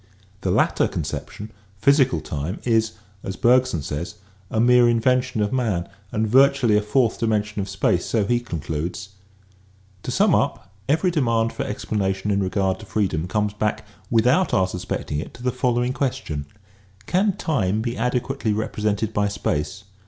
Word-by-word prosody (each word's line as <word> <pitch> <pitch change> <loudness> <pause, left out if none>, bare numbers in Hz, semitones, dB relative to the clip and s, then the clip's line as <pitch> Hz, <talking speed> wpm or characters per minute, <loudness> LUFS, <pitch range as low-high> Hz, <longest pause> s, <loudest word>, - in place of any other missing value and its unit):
The 95 - -1
latter - - +2
con - - -3
ception, 105 +2 -6 0.3
physical 135 +4 +3
time, 75 +7 -4
is, 115 -2 +1 0.3
as 95 - -4
Bergson 125 - +3
says, 75 +7 -4 0.3
a 110 - -1
mere 120 +1 +5
in 115 -1 +2
vention 125 -1 +1
of 105 - -2
man 105 -9 0 0.2
and 110 +1 0
virtually 130 -2 +4
a 105 - +4
fourth 110 +3 +1
dimension 105 -2 0
of 95 - -5
space, 95 -2 +1
so 110 -3 +1
he 120 +3 +2
concludes: 85 -1 -4 0.9
To - - -6
sum - - +3
up; 95 - 0 0.2
every 165 +5 +2
demand 115 -7 +1
for - - -3
explanation 100 -1 -2
in 100 0 +1
regard 95 0 0
to 110 - -10
freedom 90 -6 -1
comes 105 +1 0
back, 105 0 -2 0.2
without 125 +11 +3
our 95 -1 +3
suspecting 90 -5 -4
it, - - -7
to 120 - -12
the 125 - +1
following 125 0 0
question: 80 - -3 0.3
" 95 0 -29
Can 195 +2 +2
time 110 - 0
be 120 0 -2
adequately 125 -1 -1
represented 105 0 -1
by 105 -1 +1
space 90 -4 -2
110 Hz, 165 wpm, -23 LUFS, 95-125 Hz, 0.9 s, mere